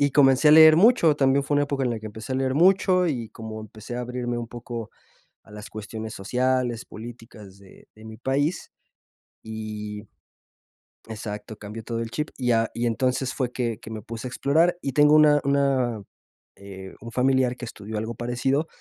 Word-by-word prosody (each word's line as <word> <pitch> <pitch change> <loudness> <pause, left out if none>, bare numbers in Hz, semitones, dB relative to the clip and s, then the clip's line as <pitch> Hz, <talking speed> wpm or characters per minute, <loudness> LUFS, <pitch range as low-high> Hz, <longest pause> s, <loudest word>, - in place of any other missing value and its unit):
y 145 0 +3
comencé 135 +1 +5
a - - +8
leer 160 0 +9
mucho, 175 -6 +5
también 135 0 +3
fue 145 +1 0
una 145 - +3
época 140 -1 -2
en 125 - 0
la 115 - -2
que 110 - -8
empecé 110 +4 -7
a - - 0
leer 130 0 0
mucho, 185 +2 +4
y 120 -7 -3
como 110 -1 -8
empecé 110 +2 -9
a - - -3
abrirme 125 0 -3
un 120 - -4
poco 120 -2 -7 0.5
a - - -21
las 105 0 -9
cuestiones 110 +1 -7
sociales, 125 +2 -1
políticas 110 -3 -11
de 100 -1 -18
de 110 - -15
mi 110 0 -9
país, 140 +7 -1 0.7
y 105 -1 -6 1.1
exacto, 105 -1 -7
cambió 105 +2 -8
todo 115 +1 -4
el 115 - -4
chip, 150 +4 -3
y 125 -2 0
a 115 0 +2
y 120 +1 -1
entonces 125 +2 0
fue 125 -2 -2
que 120 -3 -2
que 110 - -10
me 110 -1 -6
puse 115 +4 -7
a - - -5
explorar. 160 +8 +2
Y 135 - -3
tengo 150 +2 +5
una 150 -1 +6
una 135 -5 +1 0.6
eh, 95 -1 -10
un 115 - -8
familiar 130 0 +2
que 125 - -7
estudió 110 -1 -8
algo 110 +2 -4
parecido, 125 +6 -1
120 Hz, 190 wpm, -24 LUFS, 110-140 Hz, 1.1 s, leer